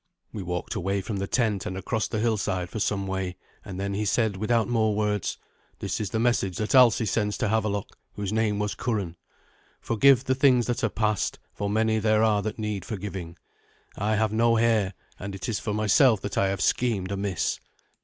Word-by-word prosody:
We 105 - -4
walked 90 -1 -3
away 95 +2 -1
from 105 +1 -4
the 100 0 -2
tent 110 -5 0
and 95 - -4
across 110 +3 -1
the 110 - -3
hillside 105 -5 -1
for 110 - -4
some 100 -1 0
way, 95 -1 -3 0.3
and 95 -1 -7
then 100 0 -2
he 105 +2 -1
said 105 0 +1
without 110 +3 +1
more 110 -3 +1
words, 105 -3 -1 0.4
"This - - -3
is 105 -3 -2
the 110 - -2
message 110 -6 +1
that 110 - -2
Alsi 125 -3 +6
sends 105 0 0
to - - 0
Havelok, 105 -2 -1 0.2
whose 105 0 -3
name 110 -2 +1
was 105 0 -1
Curan. 100 -8 -2 0.6
'Forgive 130 +2 +4
the 130 - +1
things 130 -2 +4
that 120 -1 -2
are - - +3
past, 110 -2 0 0.2
for 100 0 -3
many 110 +1 +2
there 110 0 +3
are 105 -2 +3
that 105 +1 -4
need 105 -4 -3
forgiving. 95 -6 -6 0.6
I 105 +2 0
have 110 0 +1
no 115 +1 +3
heir, 110 -4 +2 0.2
and 100 +1 -6
it 95 0 -6
is 110 -4 -1
for 105 - -3
myself 110 +2 +4
that 100 - -4
I 100 - +2
have 95 0 -2
schemed 100 -5 +1
amiss. 100 -3 -1
105 Hz, 200 wpm, -26 LUFS, 100-110 Hz, 0.6 s, Alsi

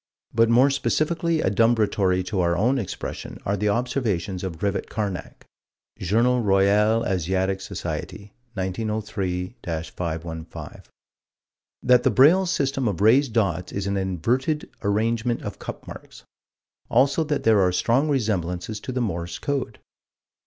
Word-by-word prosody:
But 115 0 +4
more 125 +4 +5
specifically 160 +3 0
adumbratory 100 -3 +2
to 95 +1 -2
our 85 0 +1
own 125 +8 +2
expression 105 - -6
are 100 - +1
the 105 +1 0
observations 105 -5 -1
of 90 -4 -4
Rivett 100 +3 -2
Carnac 100 -4 -5 0.5
(Jour. 105 +6 +2 0.2
Roy. 95 -2 +3
Asiatic 95 -3 +1
Soc., 95 -2 -7 0.2
1903 105 -2 -4
515): 80 0 -5 1.0
That 125 0 +5
the - - +3
Braille 175 +8 +5
system 135 -6 0
of 100 -6 -2
raised 115 +4 +4
dots 100 -5 0
is 100 0 -3
an 100 0 -1
inverted 115 - -1
arrangement 115 +3 0
of - - -6
cup - - -7
marks: - - -11 0.7
also 135 +6 +3
that 150 -1 -1
there 110 -3 +5
are 90 -1 +3
strong 120 +11 +1
resemblances 105 - -1
to 130 - -6
the 130 0 -1
Morse 85 -6 -3
code. 135 -6 -3
105 Hz, 130 wpm, -24 LUFS, 95-125 Hz, 1.0 s, more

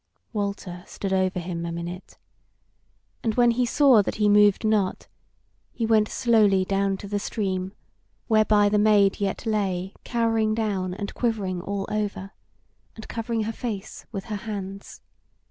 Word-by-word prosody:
Walter 200 -4 -4
stood 195 -1 -4
over 185 -1 +1
him 170 -1 -4
a 170 - -3
minute, 170 +2 -7 1.1
and 220 -2 0
when 240 -1 +5
be 245 +1 +1
saw 265 -5 +5
that - - -3
he 210 -1 +2
moved 205 +1 +5
not, 210 -3 0 0.6
he 230 - -2
went 220 -1 +3
slowly 210 -5 +3
down 195 0 0
to 200 - -9
the 205 0 -1
stream, 190 -3 -3 0.5
whereby 215 -2 +4
the 210 0 +2
Maid 205 -2 +4
yet 200 +3 -2
lay 195 -4 -1
cowering 225 -2 +1
down 195 -5 -1
and 200 0 -5
quivering 200 -7 -1
all 200 +1 -3
over, 205 -2 -3 0.6
and 220 - -10
covering 230 -1 -2
her 225 +1 -3
face 215 -4 -6
with 195 -3 -5
her 215 -3 -4
hands. 200 -2 -7
205 Hz, 150 wpm, -25 LUFS, 190-220 Hz, 1.1 s, when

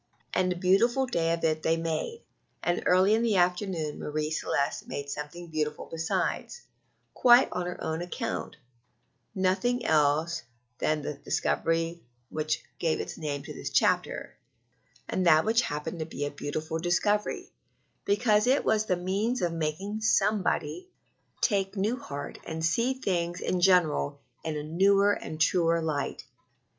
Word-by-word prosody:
And 185 0 +2
a - - -1
beautiful 210 +9 +3
day 165 -9 0
of 165 0 -1
it 155 -1 +1
they 165 +1 +2
made; 165 - -3 0.4
and 175 0 +1
early 185 +3 +5
in 225 - +3
the 230 -3 +2
afternoon 180 -4 0
Marie 150 +1 -2
Celeste 140 -2 -1
made 140 0 -5
something 150 +5 -6
beautiful 155 -2 -3
besides, 165 - -2 0.5
quite 245 +1 +6
on 180 -1 -2
her 180 - -5
own 160 +1 -2
account 175 0 -4 0.8
nothing 195 +7 +1
else 155 +2 +2 0.4
than 155 -1 0
the 150 - -3
discovery 165 +3 -1 0.3
which 155 0 -1 0.2
gives 160 -2 +1
its - - -5
name 145 -3 -3
to - - -8
this - - -5
chapter, - - +1 0.7
and 185 - -1 0.2
which 225 +2 +3
happened 150 -1 -4
to 160 - -2
be 145 -3 -4
a 145 - -3
beautiful 155 +3 -4
discovery, 205 +5 0 0.5
because 210 +1 +3
it 265 +3 +3
was 215 0 +2
the 180 - +1
means 200 +7 -1
of 170 -1 0
making 165 +7 -3
somebody 215 - +1 0.5
take 195 -2 +1
new 210 +5 +1
heart 145 - -7
and 160 0 -2
see 235 +10 +1
things 175 -7 -1
in 180 - -1
general 175 - +3 0.2
in 160 -2 -3
a 150 - -4
newer 195 +6 +4
and 155 -5 -6
truer 165 0 +3
light. 155 -3 -2
175 Hz, 150 wpm, -28 LUFS, 155-200 Hz, 0.8 s, quite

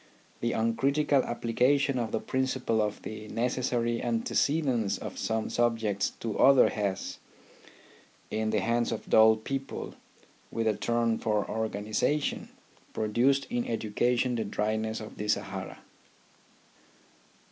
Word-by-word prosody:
The 120 0 -1
uncritical 135 +5 +2
application 125 +3 +1
of 115 -2 -2
the - - 0
principle 130 -4 0
of 105 -1 -2
the 110 0 -7
necessary 120 0 -1
antecedence 120 0 +1
of - - -7
some 110 0 -1
subjects 115 -4 +1
to 110 -3 -3
others 135 -1 +6
has, 100 -3 -3 1.1
in 110 0 -1
the 110 -2 +1
hands 115 +3 +1
of - - -5
dull 110 0 +7
people 135 +5 -5 0.6
with 115 - -2
a 110 - +2
turn 115 0 0
for 105 -2 0
organization, 110 +6 -1 0.4
produced 125 +6 +2
in 120 0 0
educa 115 +2 0
tion 125 +1 +1
the 115 -2 -1
dryness 110 +2 -2
of 110 - -9
the 105 - -4
Sahara. 95 -2 -2
115 Hz, 125 wpm, -29 LUFS, 110-125 Hz, 1.1 s, dull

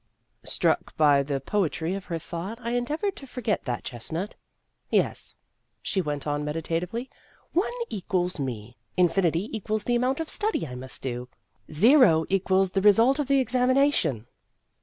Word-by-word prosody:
Struck - - 0
by 145 -2 +5
the 140 0 -2
poetry 170 -1 -1
of 195 -1 -5
her 170 -2 -3
thought, 170 +7 -6
I 235 -1 -4
endeavored 300 - -1
to 275 - -9
forget 230 -5 -2
that 125 -3 -3
chestnut. 160 - -5 0.5
"Yes," - - 0 0.4
she 190 - -1
went 145 -4 -3
on 145 0 -1
meditatively, 165 - -3 0.2
" - - -33
one - - -3 0.2
equals 180 - -2
me; 120 -3 -5 0.2
infinity 180 +2 +2
equals 215 0 -2
the 240 - 0
amount 255 +4 +1
of 325 - -2
study 430 +6 -1
I 125 - -8
must 125 +1 -6
do; 125 -1 -4 0.4
zero 180 - +5
equals 190 0 +2
the 195 - +1
result 225 +7 +5
of 290 - 0
the 275 0 +4
examination." 255 - +2
190 Hz, 155 wpm, -26 LUFS, 150-245 Hz, 0.5 s, by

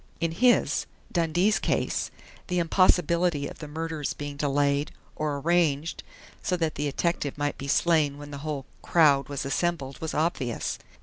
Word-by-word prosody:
In 165 0 0
his 245 +9 +3 0.2
Dundee's 175 +5 +2
case - - 0 0.4
the 180 - -1
impossibility 170 -3 +3
of - - -10
the 150 - -7
murder's 160 -1 -3
being 145 -1 -5
delayed 140 0 +1 0.2
or 150 -2 -1
arranged 160 0 +1 0.4
so 180 - 0
that 160 -2 0
the 150 - -3
detective 145 0 -1
might 145 0 -2
be 140 - -5
slain 150 -1 +3
when 145 0 -9
the 140 - -6
whole 145 -2 -4 0.2
"crowd" 145 -5 +4
was 140 -1 -3
assembled 140 -1 -1
was 160 -1 -3
obvious. 150 -7 -1
150 Hz, 150 wpm, -27 LUFS, 140-170 Hz, 0.4 s, crowd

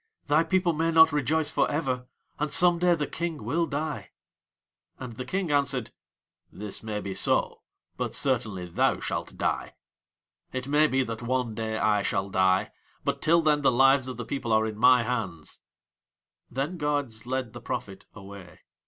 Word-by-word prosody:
thy 150 +3 +3
people 180 +1 +1
may 165 +2 0
not 160 -1 +6
rejoice 150 +2 +1
for - - +1
ever, 130 -5 -2 0.3
and 150 0 -1
some 175 -2 +5
day 175 0 +4
the 150 -2 -2
King 165 -4 -4
will 165 +9 0
die." 150 +2 -4 0.9
And 125 -3 -8
the 130 - -6
King 185 -4 -2
answered: 140 -4 0 0.6
"This 105 0 -5
may 110 -1 -4
be 100 -2 -5
so, - - +1 0.4
but - - -3
certainly 110 -9 -1
thou 85 - +1
shalt - - -4
die. - - -2 0.8
It 130 0 -4
may 150 +2 +4
be 135 -2 +1
that 115 -2 -6
one 125 -1 -1
day 110 0 -3
I 105 0 +2
shall 95 0 -2
die, 95 0 +2 0.3
but - - -2
till 165 +1 +4
then 150 -1 +3
the 140 - +4
lives 135 +1 +4
of 130 - -6
the 120 - -5
people 130 -3 -3
are 110 0 +3
in 110 -1 -4
my 125 +2 +5
hands." 110 -10 -4 0.9
Then 140 +8 -3
guards 140 -6 -2
led 130 -3 -3
the 120 - -9
prophet 105 -7 -6
away. 95 -4 -12
130 Hz, 170 wpm, -27 LUFS, 110-150 Hz, 0.9 s, not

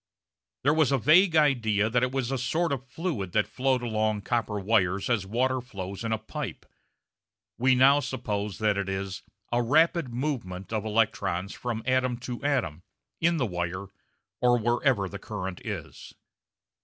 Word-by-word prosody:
There 145 +3 +4
was 155 -4 +3
a 135 - +3
vague 165 - +5
idea 115 -9 +3
that 120 +2 +1
it 125 0 +1
was 135 -2 -2
a 135 - 0
sort 160 +6 0
of 130 -1 -5
fluid 130 - -3
that 105 - +3
flowed 130 -1 0
along 110 -2 0
copper 110 -2 -1
wires 100 0 +1
as 105 -5 0
water 130 +4 0
flows 100 -4 -7
in 115 - -2
a 110 - +1
pipe. - - -6 0.9
We 130 +1 +4
now 135 +3 +6
suppose 105 -7 -3
that 105 -2 +1
it 100 -1 -2
is 95 0 -4 0.3
a 120 +1 +2
rapid 155 +2 +3
movement 115 - -4
of 110 -1 -1
electrons 105 -4 0
from 115 -2 -4
atom 130 -1 +1
to 125 +1 -6
atom 125 - 0 0.4
in 170 +1 +2
the 130 - +1
wire 90 0 -3 0.5
or 125 0 +4
wherever 120 -2 +1
the 100 +1 -7
current 95 -3 -6
is. - - -7
120 Hz, 165 wpm, -27 LUFS, 100-130 Hz, 0.9 s, now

